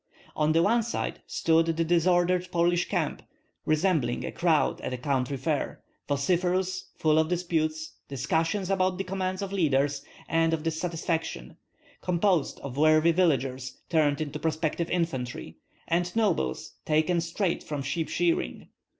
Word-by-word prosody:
On 155 0 +2
one 200 +9 +3
side 230 +1 -3
stood 165 0 +2
the 165 0 +1
disordered 175 +2 +2
Polish 175 0 +2
camp, - - -1 0.5
resembling 155 -6 +1
a - - -4
crowd 165 -3 +1
at - - -4
a - - -5
country 135 +1 -1
fair, 145 +2 -2 0.2
vociferous, 180 +6 0
full 155 -2 +3
of 160 - +2
disputes, 160 -3 -1
discussions 165 +8 -1
about 185 -1 +1
the 195 - -2
commands 185 0 -2
of 195 0 -5
leaders, 140 -5 +1 0.2
and 165 0 +2
of 155 - -8
dissatisfaction; 165 - -3 0.5
composed 180 -3 +1
of 135 -1 -7
worthy 155 +2 +5
villagers 135 -7 0
turned 155 -2 +2
into 150 -1 -4
prospective 160 +1 -1
infantry, 160 -5 -3 0.3
and 175 +3 0
nobles 185 - 0
taken 155 +3 +2
straight 170 +2 -1
from 145 -2 -4
sheep 160 +4 -2
shearing. 170 - -1
165 Hz, 135 wpm, -27 LUFS, 150-180 Hz, 0.5 s, worthy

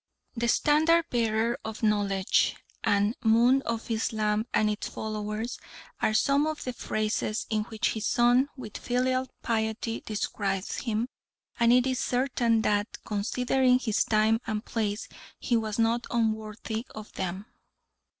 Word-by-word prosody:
The 235 0 -1
"Standard 315 +6 +4
bearer 230 +1 +1
of 220 +1 -6
knowledge" 200 -3 +2 0.3
and 205 +3 +2
"Moon 240 +4 +5
of 230 0 -3
Islam 215 0 0
and 215 - +2
its 210 0 -2
followers" 215 +2 -4 0.4
are 215 - +2
some 280 +5 +3
of 310 -1 -3
the 255 - -3
phrases 215 -1 -2
in 215 -1 0
which 220 -1 -1
his 220 - -2
son 245 +3 +4
with 225 -5 -7
filial 255 +1 0 0.2
piety 225 0 -1
describes 200 -2 -2
him, 230 0 -1 0.5
and 235 0 +5
it 250 +1 +5
is 260 -1 0
certain 245 -3 +1
that, 205 +1 0
considering 250 +4 +2
his 225 -5 +1
time 220 +1 +3
and 215 -1 -2
place, 210 -2 -2 0.3
he 240 - 0
was 220 -2 -1
not 230 +1 +1
unworthy 220 -1 -2
of 215 -1 -9
them. 190 +2 -4
225 Hz, 140 wpm, -28 LUFS, 215-245 Hz, 0.5 s, Moon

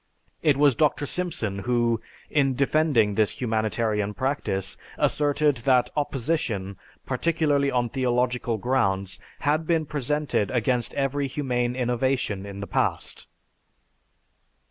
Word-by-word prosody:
It 145 -3 +3
was 145 -1 +5
Dr. 145 +3 +1
Simpson 135 - -3
who, 120 0 +1 0.3
in 135 -3 +2
defending 140 -6 +2
this 105 0 +1
humanitarian 110 -3 0
practice, 130 -8 -1 0.2
asserted 145 -1 +2
that 125 +1 +2
opposition, 125 - -2 0.3
particularly 150 -4 +1
on 125 -2 +1
theological 125 -1 0
grounds, 100 -5 0 0.2
had 155 +2 +1
been 165 -2 +2
presented 145 -6 -1
against 125 0 0
every 140 0 0
humane 125 -3 -1
innovation 125 -5 -1
in 100 0 -7
the - - -3
past. - - -2
125 Hz, 110 wpm, -25 LUFS, 110-145 Hz, 0.3 s, was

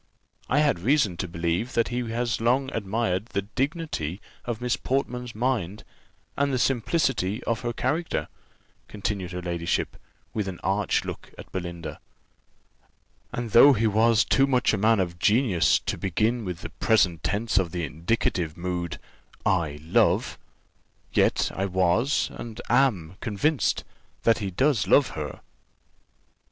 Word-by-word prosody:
I 145 +3 +3
had 145 - +2
reason 115 - +2
to 90 - -3
believe 85 +7 -2
that 115 - +1
he 120 0 -2
has 115 0 -1
long 130 +4 +2
admired 105 -1 -1
the 100 - -2
dignity 130 - -3 0.3
of 120 -2 -3
Miss 125 0 0
Portman's 125 -3 -2
mind, 110 -5 -1 0.5
and 140 0 +1
the 130 - +1
simplicity 125 - 0
of 115 -1 -1
her 120 -1 -2
character," 150 +8 -1 0.6
continued 100 -3 -3
her 90 0 -5
ladyship, 85 -1 -2 0.4
with 105 -2 -2
an 95 -3 -5
arch 100 +1 +1
look - - -7
at - - -11
Belinda; 85 -2 -5 1.3
"and 120 -2 -4
though 140 +6 +8
he 115 -2 +1
was 110 +2 +4
too 135 0 +3
much 125 -4 +2
a - - +1
man 110 +1 +4
of 85 -2 -2
genius 105 -5 +3
to - - -4
begin 110 +5 0
with 90 -1 -5
the - - -7
present 95 -7 +2
tense 105 0 +1
of 90 -3 -1
the 85 0 -3
indicative 85 0 -1
mood, 90 -1 -3 0.5
'I 80 -6 0
love,' 80 - +2 0.7
yet - - +2
I 95 +1 -1
was, 95 +9 +1
and 115 -1 -8
am, 105 -10 +2
convinced, 125 +7 0 0.4
that 115 -1 +4
he 100 -3 -2
does 110 +1 +1
love 140 +7 +5
her." 75 -3 -6
105 Hz, 145 wpm, -26 LUFS, 90-125 Hz, 1.3 s, though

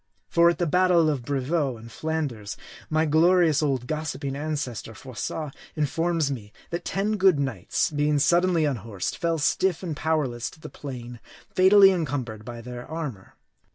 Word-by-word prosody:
For 170 0 +5
at 170 - 0
the 175 - 0
battle 175 -1 +4
of 140 -4 -2
Brevieux 135 +1 -1
in 115 +1 -11
Flanders, 135 -7 -3 0.3
my 155 +1 +2
glorious 160 0 +4
old 135 -5 0
gossiping 150 -2 -3
ancestor, 140 -7 -4
Froissart, 135 +5 -5 0.2
informs 160 0 0
me, 105 -6 -6 0.2
that 170 - -3
ten 210 +2 -1
good 190 -5 +5
knights, 140 +5 -1
being 150 0 +1
suddenly 170 +2 +3
unhorsed, 115 -8 -3
fell 165 -1 0
stiff 175 +4 +1
and 165 -4 -3
powerless 145 -7 -1
to - - -17
the - - -9
plain, 125 -4 -8 0.3
fatally 195 +1 +7
encumbered 130 - -3
by 120 +1 -8
their 120 +1 -7
armor. 145 - -6
150 Hz, 155 wpm, -25 LUFS, 125-165 Hz, 0.3 s, fatally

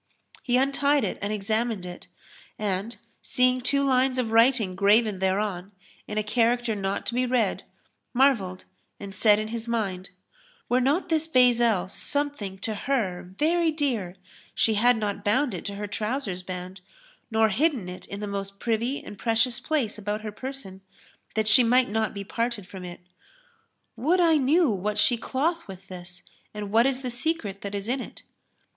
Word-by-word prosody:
He 245 -1 +2
untied 280 +2 +2
it - - -2
and 200 +1 -2
examined 215 -1 -1
it 175 0 -9 0.5
and, 205 +2 -2 0.2
seeing 255 0 +2
two 280 +2 +2
lines 260 -1 +2
of 235 -3 -1
writing 230 -4 +4
graven 205 +1 +3
thereon, 190 0 -1 0.3
in 210 - -5
a 215 - +1
character 235 +2 +1
not 195 -1 -2
to - - -3
be 250 +1 +1
read, 240 -5 +1 0.5
marvelled 235 -9 +2 0.3
and 200 -1 -8
said 210 +2 +5
in 215 0 -3
his 230 0 -5
mind, 195 -5 -2 0.6
"Were 250 +1 +2
not 300 +8 +1
this 320 -1 +1
bezel 240 - +4
something 280 -3 -3
to 220 - -2
her 210 -6 -1 0.2
very 335 +2 +2
dear 245 - -2 0.4
she 225 - +3
had 240 +3 +4
not 205 -2 -3
bound 245 +4 +2
it 180 - -6
to 200 - -4
her 205 +1 -4
trousers 210 -1 -3
band 180 0 -7 0.5
nor 220 -1 +3
hidden 250 - +1
it 180 0 -9
in 200 +1 -7
the - - -2
most 200 0 -5
privy 235 +4 -1
and 205 - -10
precious 235 +2 +1
place 265 -7 -1
about 210 +1 -3
her 215 -1 -5
person, 215 -5 -7 0.5
that 220 -1 +1
she 220 +3 +6
might 250 +1 +4
not 220 0 -1
be 200 - -4
parted 230 0 -3
from 190 -1 -9
it. 175 0 -8 0.9
Would 310 +11 +2
I 330 -3 +5
knew 300 +5 +3
what 210 +1 -2
she 245 - +3
cloth 310 +8 -1
with 190 -1 -11
this 180 -1 -10 0.3
and 205 -1 -5
what 230 +4 +5
is 270 0 -2
the 250 - -3
secret 240 - -2
that 200 0 -5
is 200 +1 -4
in 255 +2 -1
it." - - -10
220 Hz, 175 wpm, -26 LUFS, 200-255 Hz, 0.9 s, she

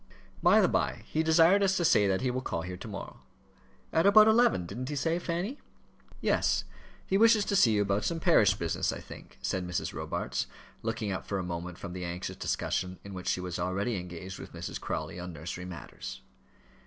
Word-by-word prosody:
"By - - +6
the - - +5
by, - - 0
he 155 - 0
desired 165 +5 +5
us 190 -1 +3
to 175 - +1
say 105 -9 +5
that 95 -1 +1
he 130 -1 +1
will 130 +1 -2
call 85 -9 -3
here 90 +1 -5
to 90 - -9
morrow; 100 -2 -7 0.7
at 165 +4 +4
about 215 +1 +8
eleven, 220 - +4
didn't 125 +9 -5
he 150 - -3
say, 165 +5 0
Fanny?" 180 - -3 0.6
"Yes; - - +2 0.4
he 195 - +1
wishes 225 -2 +6
to 200 - 0
see 115 - +5
you 105 -1 +3
about 100 +1 0
some 165 -1 -1
parish - - +5
business, - - -1
I - - -5
think," - - -12
said 95 - -1
Mrs. 90 - -2
Robarts, - - -3 0.3
looking 110 -2 -2
up 95 - -4
for 100 - -1
a 95 - -2
moment 90 0 -5
from 90 -3 -7
the 90 0 -5
anxious 90 +1 -5
discussion 90 0 -2
in 100 - -9
which 90 -1 -7
she 90 - +1
was 90 -1 -4
already 100 +5 -1
engaged 90 +1 -7
with - - -10
Mrs. - - -6
Crawley - - -4
on 90 0 -6
nursery 85 +3 -6
matters. 90 -2 -8
100 Hz, 205 wpm, -30 LUFS, -, 0.7 s, about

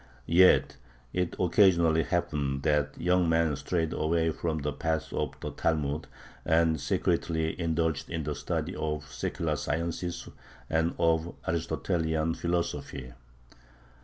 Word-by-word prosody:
Yet 90 +4 +5 0.4
it 90 -2 -1
occasionally 85 -3 +4
happened 75 -6 -1
that 75 -1 +1
young 90 0 +2
men 80 -2 +2
strayed 80 +3 -1
away 80 +1 +1
from 80 0 -2
the 75 -1 -2
path 80 +1 -2
of - - -3
the - - -4
Talmud, 75 -1 -1 0.4
and 80 -2 +2
secretly 80 -2 0
indulged 80 -2 0
in 80 -2 -3
the 75 +1 -2
study - - -3
of 75 -1 -2
secular 80 -2 -2
sciences 85 +3 -3 0.4
and 80 +1 +1
of 85 0 +1
Aristotelian 80 -1 0
philosophy. 85 -7 -3
80 Hz, 120 wpm, -29 LUFS, 75-85 Hz, 0.4 s, Yet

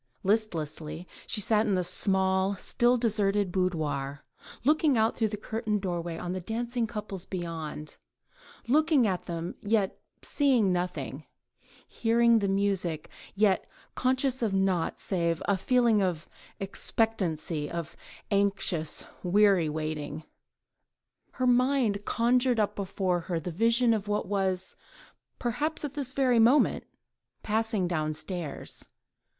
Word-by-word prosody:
Listlessly 175 -5 -2 0.2
she 210 - +1
sat 215 +1 +2
in 200 - +2
the 180 - +1
small, 190 +1 +2
still 240 +5 +2
deserted 205 -4 +1
boudoir, 155 -6 -2 0.4
looking 300 -1 +3
out 220 +1 +2
through 225 - +1
the 210 0 -4
curtained 215 -1 -2
doorway 170 -2 -3
on 175 +1 -4
the 185 - -3
dancing 235 +4 -2
couples 210 -4 -5
beyond: 165 -4 -5 0.7
looking 300 0 +4
at 185 -4 -2
them, 170 0 -4
yet 205 -2 0 0.2
seeing 250 -10 +2
nothing, 165 -5 -3 0.6
hearing 235 0 +3
the 200 - 0
music, 195 -5 -1 0.2
yet 200 -2 +2 0.2
conscious 260 0 0
of 215 -4 0
naught 190 -3 0
save 170 -5 0
a 200 - +2
feeling 235 +1 +3
of 175 -4 -1 0.3
expectancy, 180 -7 -1
of 170 -3 -5 0.4
anxious, 200 -6 +1 0.2
weary 190 -3 +4
waiting. 155 0 -4 1.1
Her 255 - -1
mind 250 -4 +2
conjured 245 +1 +2
up 210 - +1
before 185 -2 -1
her 170 0 -3
the 175 +3 -5
vision 230 +6 +3
of 210 -2 -2
what 210 -2 -1
was, 190 -2 -1 0.6
perhaps 290 +6 -1
at 285 - -5
this 275 -3 -2
very 255 -4 +3
moment, 245 +6 +4 0.6
passing 220 -3 0
downstairs. 155 0 -3
200 Hz, 120 wpm, -28 LUFS, 175-230 Hz, 1.1 s, looking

